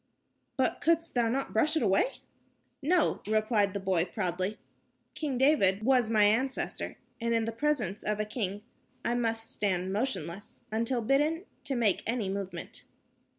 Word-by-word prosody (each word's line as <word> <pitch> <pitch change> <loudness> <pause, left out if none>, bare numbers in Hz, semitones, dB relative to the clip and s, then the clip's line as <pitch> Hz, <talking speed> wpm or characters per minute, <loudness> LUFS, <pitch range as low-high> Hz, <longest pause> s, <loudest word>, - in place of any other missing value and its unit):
"But 260 - +1
couldst 330 +1 +2
thou 235 -2 +2
not 270 +3 -2
brush 310 +8 +3
it - - +1
away?" 195 - +3 0.7
"No," 335 +4 +2
replied 215 -2 +2
the - - 0
boy, 190 -3 +1
proudly. 185 0 -2 0.6
"King 285 -5 -2
David 220 -8 +3
was 250 -2 +3
my 215 -2 +4
ancestor, 240 +6 0 0.2
and 235 0 +1
in 225 -1 +1
the 225 - -2
presence 230 -6 -1
of 210 0 -1
a 215 - 0
king 205 -2 -3 0.4
I 235 - +2
must 225 -2 -1
stand 190 -2 -1
motionless 205 - -3
until 230 +2 0
bidden 300 - +2 0.2
to 275 -2 -1
make 220 -6 +2
any 225 -4 0
movement." 195 -1 -5
225 Hz, 150 wpm, -30 LUFS, 200-265 Hz, 0.7 s, my